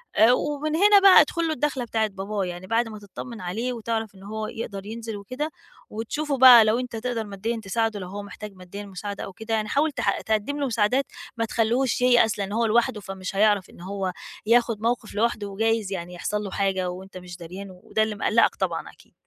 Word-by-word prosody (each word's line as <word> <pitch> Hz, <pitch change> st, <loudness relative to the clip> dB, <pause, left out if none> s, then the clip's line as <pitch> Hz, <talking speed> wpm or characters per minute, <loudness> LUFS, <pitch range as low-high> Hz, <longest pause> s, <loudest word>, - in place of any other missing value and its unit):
آآ، 225 Hz, +3 st, +6 dB
ومن 295 Hz, +3 st, -1 dB
هنا 405 Hz, +3 st, +6 dB
بقى 385 Hz, -5 st, +9 dB
ادخُل 335 Hz, +2 st, 0 dB
له 315 Hz, -, 0 dB
الدَّخلة 280 Hz, -2 st, -1 dB
بتاعة 220 Hz, -1 st, 0 dB
باباه، 195 Hz, 0 st, -3 dB
يعني 180 Hz, +1 st, -7 dB
بَعد 230 Hz, +1 st, +1 dB
ما 215 Hz, -1 st, -8 dB
تطّمن 215 Hz, +2 st, -9 dB
عليه 225 Hz, +8 st, -2 dB
وتعرَف 225 Hz, -2 st, -3 dB
إنه 195 Hz, +1 st, -12 dB
هو 215 Hz, 0 st, -4 dB
يقدَر 200 Hz, -4 st, -6 dB
ينزِل 225 Hz, -1 st, -6 dB
وكده 255 Hz, +10 st, -4 dB, 0.4 s
وتشوفه 275 Hz, +6 st, -3 dB
بقى 245 Hz, -3 st, +9 dB
لو 220 Hz, +3 st, +2 dB
أنت 250 Hz, -2 st, -5 dB
تقدَر 230 Hz, 0 st, -2 dB
ماديًا 220 Hz, +3 st, -4 dB
تساعده، 220 Hz, +1 st, -1 dB
لو 180 Hz, -, -6 dB
هو 200 Hz, +2 st, -6 dB
محتاج 205 Hz, 0 st, -9 dB
ماديًا 185 Hz, +3 st, -9 dB
مساعدة 200 Hz, +1 st, -6 dB
أو 195 Hz, -, -8 dB
كده 220 Hz, +3 st, -5 dB
يعني 215 Hz, -1 st, 0 dB
حاول 300 Hz, +5 st, +2 dB
تح -, -, -1 dB
تقدِّم 220 Hz, +7 st, -1 dB
له 280 Hz, -, 0 dB
مساعدات، 245 Hz, +3 st, +1 dB, 0.3 s
ما 230 Hz, -, +1 dB
تخلّوهوش 235 Hz, +3 st, +1 dB
ييأس، 240 Hz, -4 st, +4 dB
لإن 200 Hz, 0 st, -3 dB
هو 230 Hz, +2 st, +1 dB
لوحده 225 Hz, -1 st, +2 dB
فمش 195 Hz, -1 st, -6 dB
هيعرَف 205 Hz, -2 st, +3 dB
إن -, -, -15 dB
هو 190 Hz, 0 st, -3 dB, 0.3 s
ياخُد 230 Hz, -2 st, +3 dB
موقِف 230 Hz, -2 st, -1 dB
لوحده 215 Hz, -1 st, 0 dB
وجايز 220 Hz, 0 st, 0 dB
يعني 180 Hz, -2 st, -5 dB
يحصَل 210 Hz, +4 st, -2 dB
له 195 Hz, -, -6 dB
حاجة 190 Hz, -2 st, 0 dB
وأنت 185 Hz, +1 st, -8 dB
مش 180 Hz, -1 st, -9 dB
داريان 185 Hz, +4 st, -8 dB
وده 185 Hz, +4 st, -1 dB
اللي 215 Hz, -1 st, -2 dB
مقلّقك 225 Hz, +3 st, +3 dB
طبعًا -, -, -2 dB
أكيد. -, -, -23 dB
220 Hz, 205 wpm, -25 LUFS, 195-235 Hz, 0.4 s, بقى